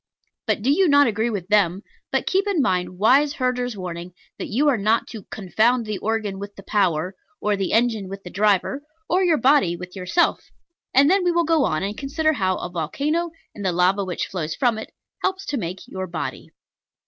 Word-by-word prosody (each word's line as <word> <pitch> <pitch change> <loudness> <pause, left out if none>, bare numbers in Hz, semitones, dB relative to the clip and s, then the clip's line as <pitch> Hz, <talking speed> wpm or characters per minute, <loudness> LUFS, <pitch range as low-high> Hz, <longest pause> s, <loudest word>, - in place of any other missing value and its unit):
But 205 - 0
do 265 - +3
you 375 +5 +4
not 285 -1 +6
agree 225 0 0
with 195 -6 -4
them: 200 -2 +2 0.3
but - - 0
keep 390 +2 +1
in 395 -5 +1
mind 185 -7 0
wise 270 +8 +4
Herder's 250 -3 -1
warning 175 -1 -6 0.3
that - - -4
you 275 +8 +1
are 285 - +4
not 215 +3 +2
to 215 -5 -9
"confound 220 +5 +1
the 210 -3 -4
organ 215 -3 -2
with 200 0 -8
the 195 - -11
power," 185 -4 0 0.3
or 210 0 +1
the 195 -1 -2
engine 225 -4 +1
with 195 0 -8
the 180 - -9
driver, 210 +7 +1 0.3
or 370 +2 +2
your 340 -4 +3
body 260 -11 +3
with 180 +2 -9
yourself: 190 - 0 0.4
and 275 +2 +5
then 380 +3 +3
we 355 - +3
will 340 0 +2
go 320 -3 +3
on 155 +3 -1
and 200 +2 -3
consider 310 +5 0
how 190 -7 0
a - - -4
volcano, 285 - -1 0.2
and 205 - -8
the 185 - +1
lava 180 +3 +2
which 180 -2 -3
flows 165 -5 -4
from 240 -4 +1
it, - - -8 0.3
helps 380 0 -1
to 295 - -3
make 185 -3 -5
your 190 0 -5
body. 170 -2 -5
215 Hz, 205 wpm, -23 LUFS, 185-280 Hz, 0.4 s, not